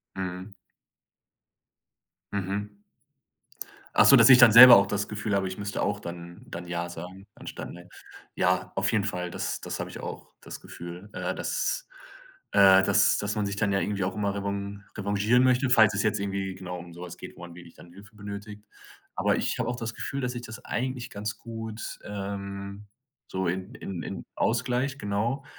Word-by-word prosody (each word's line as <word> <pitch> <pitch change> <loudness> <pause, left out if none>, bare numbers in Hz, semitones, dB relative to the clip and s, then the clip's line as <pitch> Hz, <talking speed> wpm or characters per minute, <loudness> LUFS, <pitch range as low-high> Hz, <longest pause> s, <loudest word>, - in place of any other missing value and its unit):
Mhm. 95 +1 -5 1.8
Mhm. 100 +1 -3 1.2
Ach - - +6
so, - - +9
dass - - +7
ich 125 -1 +9
dann 120 -2 +9
selber 120 +2 +12
auch 100 0 +3
das 100 0 -2
Gefühl 105 -1 -2
habe, 95 -1 0
ich 95 +2 -7
müsste 100 0 -3
auch 105 0 -1
dann 85 -1 -9
dann 85 +1 -7
ja 85 0 -3
sagen, 90 +4 -9
anstatt, - - -8
ne. 90 +1 -12 0.5
Ja, 90 0 0
auf 95 0 +1
jeden 105 -3 +1
Fall, 90 -3 -3
das - - -4
das - - -5
habe - - -5
ich - - -9
auch, - - -8
das - - -9
Gefühl, 85 +4 -10
äh, - - -3
dass - - -2 0.7
äh, 95 -1 +7
dass - - +4
dass 100 +1 -2
man 105 -1 0
sich 100 0 -3
dann 100 0 0
ja 100 - +2
irgendwie 100 -1 -2
auch 95 - -2
immer 100 -2 -1
revan 100 0 -4
revanchieren 105 +5 +2
möchte, 130 +1 +3
falls 110 -4 +6
es 100 - 0
jetzt 110 -1 +1
irgendwie 100 -1 -3
genau, 90 -1 -7
um 85 0 -11
so 85 - -11
was 90 0 -9
geht, - - -10
wo - - -14
man 85 -1 -9
wirklich 85 -1 -13
dann 85 0 -15
Hilfe 100 +2 -15
benötigt. 105 +1 -8 0.5
Aber - - +2
ich - - -2
habe - - -1
auch 125 - -2
das 115 -2 -5
Gefühl, 140 +4 -4
dass 125 -1 -2
ich 120 - -4
das 120 +1 -10
eigentlich 125 0 -3
ganz 105 0 -5
gut, 115 -1 -7
ähm, 100 0 -6 0.4
so 95 0 -3
in 95 +7 -4
in 95 -3 -6
in - - -6
ausgleiche, 125 +3 0
genau. 110 +7 -2
100 Hz, 190 wpm, -27 LUFS, 95-110 Hz, 1.8 s, selber